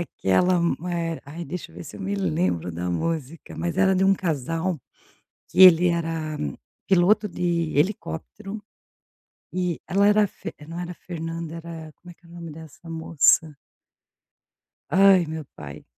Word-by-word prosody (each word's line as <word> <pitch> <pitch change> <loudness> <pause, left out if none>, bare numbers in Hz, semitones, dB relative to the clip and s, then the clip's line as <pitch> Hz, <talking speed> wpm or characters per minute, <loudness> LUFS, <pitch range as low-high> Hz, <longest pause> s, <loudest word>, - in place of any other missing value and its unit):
aquela 175 - +1 0.3
eh, 165 -1 -2
ai, 160 +5 -7
deixa 180 - -6
eu - - -16
ver 85 - -8
se - - -10
eu - - -10
me 195 +1 -2
lembro 160 - 0
da 90 +2 -3
música, 160 - -3
mas 175 +2 -2
era 190 0 +4
de 190 +1 +2
um 195 - +5
casal, 165 0 -2 0.7
que 190 - +2
ele 180 -1 +9
era 165 -2 -2 0.5
piloto 195 +3 +4
de 170 -2 -1
helicóptero, 195 - -2 0.9
e 180 -2 -1
ela 200 +2 +3
era 210 0 +4
fe - - -8
não 170 +1 -6
era 180 0 -5
Fernanda 165 -1 -6
era 165 -2 -8
como 175 0 -14
é - - -13
que 175 - -28
é 170 - -17
o - - -16
nome 170 -2 -8
dessa 160 +1 -12
moça? 160 -1 +3 1.3
Ai 190 +1 +6
meu 160 0 -5
pai. 75 0 -9
170 Hz, 160 wpm, -24 LUFS, 160-185 Hz, 1.3 s, ele